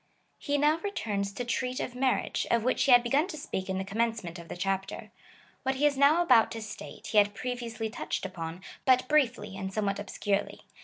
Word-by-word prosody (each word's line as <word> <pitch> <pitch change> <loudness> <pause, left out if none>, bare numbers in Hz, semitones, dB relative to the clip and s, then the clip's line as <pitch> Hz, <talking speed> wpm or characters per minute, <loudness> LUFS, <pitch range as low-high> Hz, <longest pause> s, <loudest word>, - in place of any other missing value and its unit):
He 290 -1 0
now 300 +3 +3
returns 210 - -2
to 245 - -4
treat 250 +2 -1
of 250 - -3
mar 255 +1 +2
riage, - - -3
of 235 -1 +2
which 255 - +2
he 275 - +4
had 245 -1 +8
begun 280 +8 +2
to 335 -5 -7
speak 190 -10 -4
in 190 - -1
the 190 - -1
commencement 205 -4 -2
of 170 - -11
the - - -7
chapter. 195 +1 -3 0.5
What 265 0 0
he 285 +3 +1
is 290 -1 +3
now 290 +5 +5
about 245 -8 +5
to 225 - -5
state 215 - -9
he 215 - +5
had 205 0 +2
previously 240 -2 -4
touched 220 -2 -4
upon, 170 -1 -6 0.2
but 255 -1 +4
briefly 250 -9 +1
and 190 0 -4
somewhat 200 -1 -1
obscurely. 205 0 -2
230 Hz, 210 wpm, -29 LUFS, 200-265 Hz, 0.5 s, had